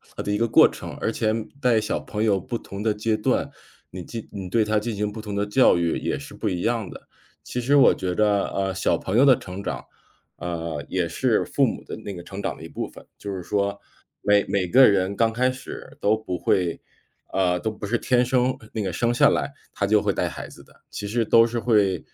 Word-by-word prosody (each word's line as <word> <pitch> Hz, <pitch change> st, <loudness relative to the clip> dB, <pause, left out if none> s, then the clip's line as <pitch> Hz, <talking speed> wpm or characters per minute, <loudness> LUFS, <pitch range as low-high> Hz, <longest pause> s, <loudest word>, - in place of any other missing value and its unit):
呃， -, -, -4 dB
的 105 Hz, -, -2 dB
一 105 Hz, -, +1 dB
个 115 Hz, +1 st, +1 dB
过 -, -, +7 dB
程。 -, -, -8 dB
而 -, -, 0 dB
且 110 Hz, -1 st, 0 dB, 0.3 s
在 120 Hz, -3 st, +4 dB
小 105 Hz, -, -2 dB
朋 105 Hz, +1 st, -3 dB
友 100 Hz, -3 st, +3 dB
不 120 Hz, +6 st, -4 dB
同 100 Hz, -1 st, -8 dB
的 110 Hz, -2 st, +2 dB
阶 110 Hz, +1 st, 0 dB
段， 105 Hz, -, 0 dB, 0.4 s
你 90 Hz, -1 st, -7 dB
进 115 Hz, -2 st, -7 dB
你 95 Hz, -3 st, -6 dB
对 110 Hz, +3 st, +3 dB
他 105 Hz, 0 st, +1 dB
进 110 Hz, 0 st, -4 dB
行 105 Hz, 0 st, -2 dB
不 110 Hz, 0 st, -7 dB
同 105 Hz, -2 st, -6 dB
的 100 Hz, 0 st, 0 dB
教 105 Hz, -3 st, +4 dB
育 85 Hz, -1 st, 0 dB
也 -, -, -2 dB
是 145 Hz, +1 st, -10 dB
不 110 Hz, -, -3 dB
一 90 Hz, -3 st, -1 dB
样 115 Hz, -4 st, -1 dB
的。 -, -, -12 dB, 0.4 s
其 125 Hz, -, -4 dB
实 135 Hz, +4 st, +2 dB
我 140 Hz, -, +7 dB
觉 90 Hz, -1 st, -2 dB
着， 105 Hz, 0 st, +2 dB
呃， 95 Hz, -1 st, -1 dB
小 95 Hz, -, +1 dB
朋 95 Hz, +4 st, -2 dB
友 135 Hz, -, +6 dB
的 130 Hz, -3 st, +7 dB
成 95 Hz, +2 st, -8 dB
长， -, -, -4 dB, 0.5 s
呃， 85 Hz, -4 st, -4 dB
也 90 Hz, -2 st, 0 dB
是 -, -, +1 dB
父 -, -, +2 dB
母 -, -, -3 dB
的 -, -, -6 dB
那 100 Hz, -, -7 dB
个 90 Hz, -, -8 dB
成 100 Hz, +1 st, -7 dB
长 -, -, -2 dB
的 -, -, -12 dB
一 -, -, -7 dB
部 -, -, -4 dB
分。 -, -, -14 dB
就 100 Hz, -1 st, -6 dB
是 90 Hz, -, -5 dB
说 100 Hz, +1 st, -1 dB, 0.4 s
每 105 Hz, 0 st, +3 dB
每 95 Hz, -2 st, 0 dB
个 130 Hz, +7 st, +7 dB
人 100 Hz, 0 st, +2 dB
刚 115 Hz, 0 st, +2 dB
开 125 Hz, +2 st, +2 dB
始 130 Hz, 0 st, -10 dB
都 105 Hz, +2 st, +3 dB
不 90 Hz, -5 st, -4 dB
会 85 Hz, 0 st, 0 dB, 0.5 s
呃， 90 Hz, -2 st, +1 dB
都 110 Hz, +4 st, -2 dB
不 105 Hz, -, -7 dB
是 120 Hz, +3 st, +1 dB
天 125 Hz, +1 st, +2 dB
生 125 Hz, +1 st, +1 dB, 0.2 s
那 110 Hz, -, -2 dB
个 95 Hz, -, -2 dB
生 120 Hz, +7 st, 0 dB
下 140 Hz, +3 st, +5 dB
来 140 Hz, -, -1 dB, 0.2 s
他 100 Hz, -, -1 dB
就 105 Hz, 0 st, +4 dB
会 -, -, +1 dB
带 -, -, -1 dB
孩 -, -, -7 dB
子 -, -, -14 dB
的， -, -, -23 dB, 0.2 s
其 100 Hz, -, -5 dB
实 115 Hz, +2 st, 0 dB
都 115 Hz, +2 st, +6 dB
是 120 Hz, 0 st, -3 dB
会， 105 Hz, -6 st, +2 dB
105 Hz, 265 characters per minute, -24 LUFS, 95-115 Hz, 0.5 s, 过